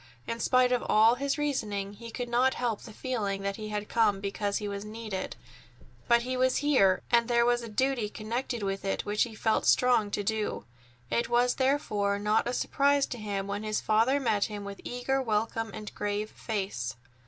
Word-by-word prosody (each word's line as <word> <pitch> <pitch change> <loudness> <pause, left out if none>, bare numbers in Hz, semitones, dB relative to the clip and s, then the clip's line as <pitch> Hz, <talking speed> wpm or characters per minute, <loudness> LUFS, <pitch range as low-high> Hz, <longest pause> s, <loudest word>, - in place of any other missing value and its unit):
In 230 - -4
spite 255 +1 +3
of 250 - +1
all 220 +2 +6
his 280 +4 -1
reasoning, 210 -9 -2
he 230 +3 -10
could 245 +2 -4
not 250 +2 +2
help 235 -4 -1
the 225 - -10
feeling 205 -5 -3
that 200 0 -2
he 215 -1 -6
had 210 0 -3
come 215 -4 +2
because 200 0 -2
he 210 - -4
was 200 0 -4
needed, 215 -3 -5 0.7
but 235 -1 +4
he 255 +1 -2
was 255 0 +2
here, 195 -11 +4
and 235 -1 +4
there 235 -1 +3
was 240 0 +2
a 230 - -7
duty 245 -1 0
connected 230 +2 -3
with 195 0 -2
it 195 - -2
which 210 +1 -1
he 230 -3 0
felt 220 0 +1
strong 245 -4 +4
to 205 - -2
do. 215 - -2 0.5
It 235 0 +1
was 245 +1 +3
therefore 215 -7 +1
not 210 +3 +1
a 245 - -1
surprise 280 +2 +2
to 245 - -7
him 200 -2 -3
when 200 +1 -3
his 215 0 -1
father 230 +6 +3
met 215 -6 +1
him 205 -2 -6
with 200 0 -8
eager 255 +2 -1
welcome 225 -1 -1
and 210 +1 -8
a - - -27
grave 205 +1 -2
face. 190 - -3
220 Hz, 200 wpm, -29 LUFS, 205-245 Hz, 0.7 s, all